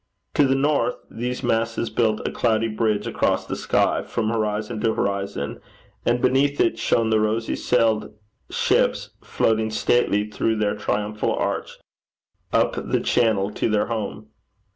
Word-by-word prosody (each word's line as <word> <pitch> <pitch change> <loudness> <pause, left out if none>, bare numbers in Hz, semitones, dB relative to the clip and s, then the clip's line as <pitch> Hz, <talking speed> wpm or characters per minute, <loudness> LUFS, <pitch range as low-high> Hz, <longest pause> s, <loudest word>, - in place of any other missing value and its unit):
To 145 - +4
the 135 - +2
north, 135 -3 +1 0.2
these 125 +3 -4
masses 115 -1 0
built 110 -2 +1
a - - -2
cloudy 115 -1 +1
bridge 110 -1 0
across - - 0
the - - -4
sky - - +1
from 110 - -2
horizon 110 0 -2
to 115 -2 +1
horizon, 100 -7 -2 0.5
and 120 +1 +3
beneath 135 +3 +2
it 115 0 +2
shone 115 0 +1
the 110 - +4
rosy 110 +1 0
sailed 115 -3 +1 0.4
ships - - +1
floating 110 0 +1
stately 105 -1 +1
through 110 +1 0
their 105 -1 0
triumphal 105 +1 -1
arch - - -3 0.7
up - - +2
the - - 0
channel 105 -4 +1
to 110 - -1
their 105 -1 +2
home. 110 0 -5
110 Hz, 145 wpm, -23 LUFS, 105-120 Hz, 0.7 s, To